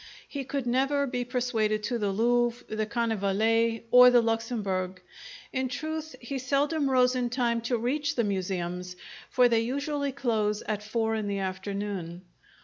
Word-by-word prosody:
He 280 -2 -5
could 275 -1 -3
never 270 +3 +1
be 250 -2 -2
persuaded 235 -4 0
to 240 +2 -1
the 205 -2 0
Louvre, 240 +3 +1
the 215 0 -1
Carnavalet, 225 0 +1
or 250 0 +9
the 245 -1 +6
Luxembourg; 210 -5 -2 0.5
in 260 0 0
truth, 315 +3 -4
he 265 +3 -5
seldom 280 +3 +1
rose 255 -1 +4
in 245 -1 0
time 235 -2 0
to 240 +1 0
reach 285 +5 -1
the 235 - +2
museums, 180 -2 -3 0.3
for 250 -1 +5
they 230 -2 +3
usually 280 +3 -2
close 220 -6 0
at 210 -1 -3
four 225 +1 -1
in 215 -2 -2
the 200 0 -1
afternoon. 190 -2 -4
235 Hz, 155 wpm, -28 LUFS, 210-255 Hz, 0.5 s, or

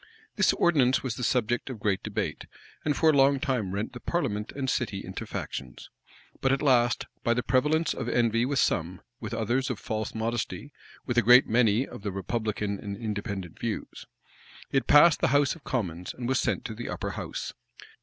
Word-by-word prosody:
This 210 -4 +4
ordinance 135 -7 +3
was 130 -4 -2
the 125 - -6
subject 120 +1 0
of 125 -4 -6
great 100 -2 0
debate, - - -4 0.4
and 150 -2 0
for 160 -1 +5
a - - 0
long 135 0 +5
time 125 -9 -1
rent 100 +3 -3
the 120 - -7
parliament 115 -10 -2
and 135 -1 -4
city 110 -7 -1
into - - -6
factions. 65 -2 -6 0.5
But 135 - +2
at 135 +2 +1
last, 120 -4 +3 0.2
by 115 - +2
the 125 - 0
prevalence 150 +7 +2
of 125 -2 -4
envy 115 -1 +2
with 140 +2 0
some; 90 -6 0 0.2
with 110 -3 -6
others, 120 +4 0
of 125 - -2
false 110 0 -4
modesty; 115 +5 -3 0.3
with 120 -2 +2
a - - +4
great 125 +4 +7
many, 115 +1 +3
of - - -10
the 100 -1 -3
republican 100 +1 -2
and 100 -1 -6
Independent 100 -5 -5
views; 115 -2 -5 0.6
it 135 - +1
passed 150 +2 +7
the - - +4
house 145 -1 +2
of 165 - -14
commons, 90 - -3
and 120 -1 -4
was 130 0 +2
sent - - -1
to 115 - -4
the 120 +2 -6
upper - - -3
house. - - -5
120 Hz, 195 wpm, -27 LUFS, 105-135 Hz, 0.6 s, great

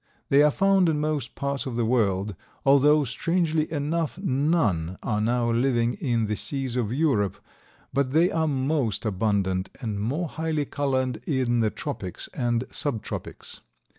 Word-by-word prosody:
They 140 +1 +6
are 150 - +6
found 195 +2 +3
in 150 -2 0
most 150 -5 -2
parts 140 -1 -2
of 125 - -4
the 120 -1 +1
world, 105 -4 +1 0.3
although 145 +2 +5
strangely 160 +4 0
enough 160 +2 -1
none 130 - +1
are 105 -2 0
now 120 +1 +1
living 120 0 +2
in 120 - 0
the 105 0 -1
seas 125 +4 -3
of 115 -4 -1
Europe, 125 - +1 0.6
but 140 -1 +1
they 165 +7 +3
are 160 -1 +1
most 135 - 0
abundant 95 -2 0
and 110 -6 -3
more 140 - -1
highly 160 -1 -2
colored 130 -4 -1
in 130 -5 +1
the 110 -1 +2
tropics - - -5
and 120 -1 0
subtropics. 135 -9 -5
130 Hz, 150 wpm, -25 LUFS, 115-150 Hz, 0.6 s, They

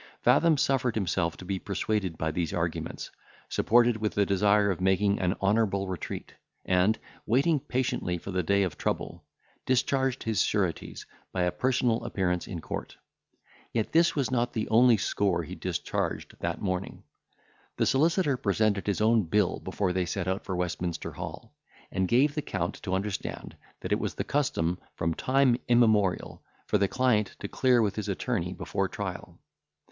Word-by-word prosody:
Fathom 165 -3 +5
suffered 130 -4 +1
himself 90 -4 0
to 90 - -10
be 95 0 -2
persuaded 100 -3 -2
by 80 0 -1
these 85 +2 -2
arguments, 85 -1 -3 0.4
supported 120 0 +3
with 110 -1 -2
the 100 - +3
desire 100 +1 +3
of 90 - -4
making 95 +2 +2
an 90 0 +1
honourable 100 -1 +1
retreat, 95 -3 -5 0.3
and, 90 +4 +3 0.3
waiting 140 +7 +3
patiently 125 -9 -1
for 95 - -7
the 90 0 0
day 100 +4 +2
of 85 -5 -4
trouble, - - -3 0.4
discharged 130 0 +1
his 110 -2 +1
sureties, 95 -6 -1 0.3
by 90 - 0
a 90 - +1
personal 125 -1 +1
appearance 90 -2 -1
in 90 - -5
court. - - -6 0.8
Yet 110 -2 -1
this 170 +1 +4
was 140 -3 0
not 120 -1 0
the 110 - -2
only 115 +1 +6
score 95 -4 0
he 75 - -8
discharged - - -3
that - - -2
morning; 95 -1 -3 0.7
the - - +2
solicitor 150 0 +2
presented 100 -2 +1
his 100 +1 0
own 110 -2 +4
bill 105 +5 +1
before 95 0 -2
they 90 -1 0
set 95 -1 -3
out 95 +1 -1
for 95 - -3
Westminster 90 -1 -3
Hall, - - -8 0.4
and 95 0 0
gave 135 +8 +3
the 150 - -2
Count 90 - -2
to 95 -2 -1
understand 100 +1 -4 0.3
that - - -5
it - - +2
was - - -3
the - - -2
custom, 90 - 0 0.2
from 80 +1 -1
time 130 +3 +2
immemorial, 110 -6 +2 0.2
for 105 - +1
the 100 - +3
client 115 -3 +1
to 100 - -4
clear 125 +1 +3
with 100 -1 -1
his 105 -1 -3
attorney 95 - -1
before - - -2
trial. - - -6
100 Hz, 165 wpm, -28 LUFS, 95-120 Hz, 0.8 s, only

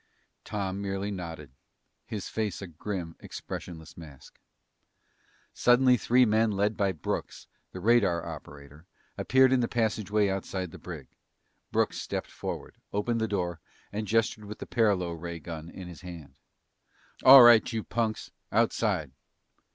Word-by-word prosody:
Tom 100 -1 -3
merely 100 +1 -3
nodded, 80 -7 -7 0.6
his 105 -5 -5
face 105 -4 -3
a 100 - -6
grim, 85 0 -5
expressionless 80 -3 -8
mask. 75 -5 -13 1.1
Suddenly 125 +1 +5
three 125 +1 +4
men 110 0 +3
led 105 +1 0
by 100 -1 +1
Brooks, 80 -6 -4 0.3
the 95 - -7
radar 100 -5 +3
operator, 75 +3 -10 0.3
appeared 130 0 +4
in 130 - +4
the 120 - +1
passageway 110 -3 +1
outside 95 -2 -3
the - - -11
brig. 80 -7 -8 0.7
Brooks - - 0
stepped - - -4
forward, - - -6
opened 115 +3 -1
the 110 - +1
door, 90 -5 -2 0.3
and 105 +1 -3
gestured 110 0 +1
with 105 +1 -8
the - - -7
paralo 100 -7 +1
ray 85 +1 -6
gun 80 0 -8
in 90 0 -9
his 85 - -11
hand. 85 -4 -10 0.9
"All 130 -1 +11
right, 120 0 +7
you 110 -2 -2
punks! 110 -2 -2 0.2
Outside!" 105 - +1
100 Hz, 140 wpm, -28 LUFS, 85-110 Hz, 1.1 s, All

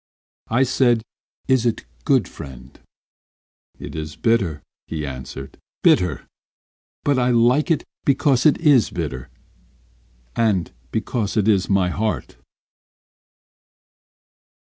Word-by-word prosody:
I 125 +4 +3
said, 120 -3 +2 0.4
"Is 130 -3 +3
it 115 - -1 0.2
good, - - +3
friend?" 65 -1 -11 1.0
"It - - -8
is 75 -1 -5
bitter 115 -5 +2
bitter," 75 -2 -10 0.3
he 80 -2 -4
answered; 65 0 -8 0.3
"But 95 - -4
I 125 0 +2
like 125 +6 +3
it 165 - +2 0.2
Because 135 -1 +3
it 150 - +4
is 145 -8 +4
bitter, 75 -7 -5 1.1
And 105 -7 +1 0.2
because 110 -1 -2
it 105 -1 +2
is 100 -4 +2
my 95 -2 +2
heart." 105 +4 -2
110 Hz, 105 wpm, -21 LUFS, 80-125 Hz, 1.1 s, it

